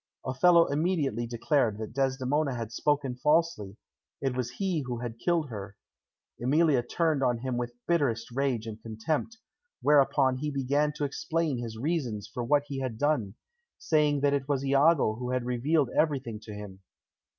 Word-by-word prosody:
Othello 165 +6 +5
immediately 145 - 0
declared 120 -1 +1
that 110 +1 -6
Desdemona 135 +1 0
had 115 -2 -5
spoken 140 0 0
falsely; 150 - +1 0.4
it 135 -2 -1
was 125 -2 -2
he 185 -6 0
who 120 -1 -3
had 115 -1 -6
killed 165 -1 0
her. 100 -1 -7 0.6
Emilia 145 +1 +3
turned 155 +4 0
on 125 -2 +2
him 125 +1 -3
with 120 0 -3
bitterest 130 -9 0
rage 130 -3 -1
and 110 -1 -7
contempt, 115 - -3 0.4
whereupon 135 -2 +3
he 150 +3 -2
began 140 +2 +1
to 145 - -2
explain 155 0 -1
his 115 -2 -6
reasons 125 - -2
for 125 - -5
what 145 +4 +3
he 140 -2 -5
had 130 -4 -3
done, 120 -8 0 0.4
saying 150 -3 +2
that 140 0 +3
it 140 -1 -1
was 140 -2 0
Iago 140 -4 +3
who 125 0 -4
had 125 -1 -1
revealed 130 +3 +1
everything 135 -8 0
to 110 - -8
him. 105 -2 -8
135 Hz, 160 wpm, -28 LUFS, 120-150 Hz, 0.6 s, Othello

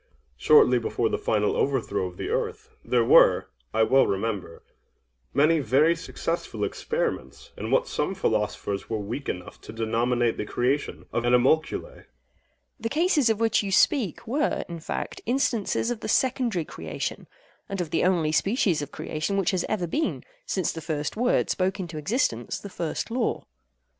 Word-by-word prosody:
Shortly 125 - +5
before 115 0 -1
the - - -1
final 105 -1 +1
overthrow 130 -8 0
of 90 - -11
the - - -4
earth, - - -3
there 120 -2 +2
were, - - +6 0.2
I 110 - +3
well 135 +4 +4
remember, 100 -4 -3 0.7
many 155 +3 +4
very 150 +4 +3
successful 165 0 -4
experiments 475 0 -3
in - - -5
what - - +2
some 195 - -2
philosophers 105 - -1
were 110 - -1
weak 115 +7 -5
enough 90 -1 -6
to - - -10
denominate 115 +1 0
the - - -3
creation 135 +4 -1
of 120 - +1
animalculæ. 125 +6 +2
AGATHOS. - - -17 0.7
The 230 - -2
cases 305 -3 +2
of 220 -1 +1
which 225 -1 +3
you 200 -2 -4
speak 200 - +2
were, 285 +6 0
in 170 -1 -6
fact, 160 - -5
instances 240 -3 0
of 240 - -3
the - - -5
secondary 240 - +1
creation—and 200 - -7
of 175 -3 -3
the - - +1
only 170 -4 +2
species 190 - +1
of 145 0 -6
creation 155 +6 -3
which 195 -3 +2
has 185 -3 0
ever 205 -5 0
been, 305 - -2 0.2
since 185 -3 0
the 165 - -7
first 150 -2 -3
word 245 +3 +1
spoke 190 +1 0
into 165 -4 -5
existence 145 - -1
the 200 - -9
first 170 +4 -4
law. 240 -1 -1
165 Hz, 165 wpm, -26 LUFS, -, 0.7 s, were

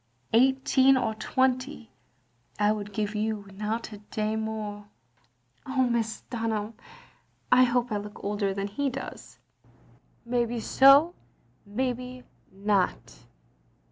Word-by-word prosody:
Eighteen 265 +2 +4
or 230 -4 0
twenty 255 +2 -1 0.7
I 210 0 +3
would 210 -1 -4
give 210 0 -2
you, 215 -1 -2
and 195 0 -14
not 220 +2 -3
a 205 - -9
day 215 +1 -3
more. 215 -2 -4 0.4
'* 120 - -40
"Oh, 260 -1 +2
Mrs. 225 -2 -1
Dunham, 225 -2 -2 0.8
I 255 0 +7
hope 245 -1 0
I 210 - 0
look 205 0 -8
older 205 -1 -1
than 195 +1 -3
he 275 +8 -1
does." 270 +1 -8 0.5
" - - -32
Maybe 240 -1 0
so 275 +8 +6 0.5
and 205 - -15
maybe 250 0 -3 0.3
not. 195 - -1
220 Hz, 130 wpm, -27 LUFS, 210-255 Hz, 0.8 s, I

